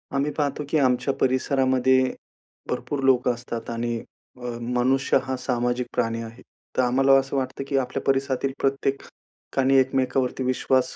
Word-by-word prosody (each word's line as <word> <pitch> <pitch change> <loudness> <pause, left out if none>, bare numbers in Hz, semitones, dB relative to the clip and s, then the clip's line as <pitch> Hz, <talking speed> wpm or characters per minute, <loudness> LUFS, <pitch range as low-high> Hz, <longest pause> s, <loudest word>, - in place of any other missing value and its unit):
आम्ही 145 +2 +1
पाहतो 145 -1 -1
की 155 - +2
आमच्या 130 0 +2
परिसरामध्ये 130 0 +2 0.7
भरपूर 140 -2 -3
लोकं 125 -2 +3
असतात 120 -1 -6
आणि 120 0 -2 0.4
अ, - - -16 0.2
मनुष्य 125 +3 +2
हा 130 - -2
सामाजिक 125 -1 -1
प्राणी 115 -1 0
आहे. 115 +2 -10 0.4
तर - - +5
आम्हाला 135 +2 +3
असं 135 +1 -4
वाटतं 130 +1 -3
की 140 - 0
आपल्या 135 +1 -1
परिसरातील 135 0 +1
प्रत्येकाने 135 0 -1
एकमेकावरती 130 0 0
विश्वास 130 0 +1
130 Hz, 135 wpm, -24 LUFS, 125-135 Hz, 0.7 s, तर